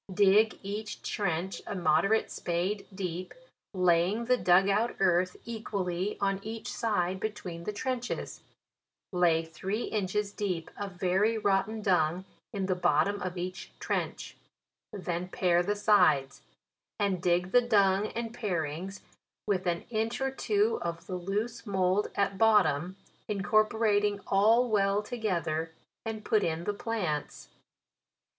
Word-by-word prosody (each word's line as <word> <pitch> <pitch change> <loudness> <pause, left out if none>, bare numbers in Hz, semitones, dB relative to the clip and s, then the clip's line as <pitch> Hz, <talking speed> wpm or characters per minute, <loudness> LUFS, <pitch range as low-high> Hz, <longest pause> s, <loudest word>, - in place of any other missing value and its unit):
" - - -13
Dig 215 +3 +4
each 205 +2 -5
trench 180 -1 -2
a - - -4
moderate 175 +5 +2
spade 180 +4 -2
deep, 185 -2 -5 0.4
laying 180 +4 +2
the 250 +1 +4
dug 185 -4 +4
out 215 +4 +1
earth 180 -1 +2
equally 200 -4 -3
on 195 -1 0
each 220 +2 -6
side 190 -5 0
between 180 -5 -5
the - - -1
trenches* 245 +3 -4 0.7
Lay 170 -2 +3
three 195 +7 -3
inches 205 0 -1
deep 185 -6 -3
of 200 -2 -5
very 190 +5 +1
rotten 210 +1 0
dung 180 -1 +2 0.3
in 195 -3 -2
the 185 - +1
bottom 180 +3 +1
of 185 0 -4
each 180 +1 -5
trench; - - -3 0.6
then 180 -2 -3
pare 175 -1 +2
the 205 +4 -1
sides, 180 -10 +3 0.6
and 195 -4 0
dig 180 +1 +1
the 245 - +6
dung 205 -3 +3
and 230 0 -5
parings 180 -3 -3 0.4
with 190 -3 0
an 170 -1 0
inch 225 +1 -1
or 270 0 0
two 425 +10 +1
of 170 0 -4
the 185 - -6
loose 210 +6 -3
mould 190 +1 +1
at 195 -1 0
bottom, 190 -6 +3 0.3
incorporating 210 0 +2
all 220 +5 +4
well 205 -2 +2
to 225 - -6
gether, 165 -6 -1 0.3
and 220 -1 -5
put 215 -2 +2
in 165 0 -1
the 205 - -1
plants. 200 -9 -3
195 Hz, 135 wpm, -29 LUFS, 180-215 Hz, 0.7 s, the